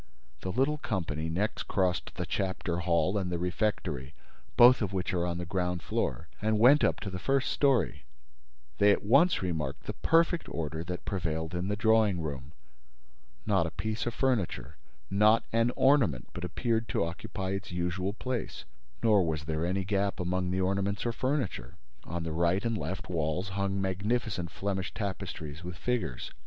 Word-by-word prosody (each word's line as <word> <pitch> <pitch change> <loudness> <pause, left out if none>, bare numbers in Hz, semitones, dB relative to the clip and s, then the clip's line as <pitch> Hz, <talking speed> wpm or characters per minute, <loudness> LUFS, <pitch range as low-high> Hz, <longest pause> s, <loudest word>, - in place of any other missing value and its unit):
The 95 - -4
little 135 +7 +1
company 80 - -2
next 95 +7 -1
crossed 95 -3 0
the - - -3
chapter 95 -3 -2
hall 85 +3 +2
and 90 -2 -3
the 85 - 0
refectory, 85 - -2 0.4
both 125 +1 +8
of 100 -3 -1
which 95 +1 -1
are 90 -1 +1
on 85 -1 -2
the 90 - -4
ground 90 -1 -1
floor, - - -2
and 110 0 +2
went 130 +7 +6
up - - +2
to 100 - -4
the 90 - -4
first 135 +3 +1
story. 125 - +2 0.7
They 105 0 +6
at - - +1
once 140 - +4
remarked 75 -6 -2
the - - -4
perfect 165 +1 +2
order 80 0 -3
that 90 0 -5
prevailed 80 -3 -2
in 90 +1 -2
the 105 - 0
drawing 110 -3 +3
room. 70 -2 -5 0.9
Not - - +2
a - - -3
piece 110 +2 -3
of 120 - -2
furniture, 110 - 0 0.4
not 105 +3 +5
an 115 +1 +3
ornament 120 - +3
but 90 - -6
appeared 115 +5 -1
to - - +1
occupy 95 +3 -5
its 100 -1 -4
usual 90 +2 -1
place; 125 +1 -4 0.4
nor 105 -4 +5
was 80 -3 -2
there 80 +2 -1
any 95 +2 0
gap 100 0 0
among 90 0 -1
the 95 +1 0
ornaments 100 +3 0
or 120 - +1
furniture. 130 - -2 0.3
On 85 0 -4
the 80 -1 -3
right 85 +6 +1
and 115 -1 +1
left 95 -2 -4
walls 85 +2 -1
hung 100 0 -1
magnificent 95 0 -1
Flemish 95 +1 -3
tapestries 90 -6 -5
with 90 0 -6
figures. 90 - -2
95 Hz, 170 wpm, -30 LUFS, 85-110 Hz, 0.9 s, both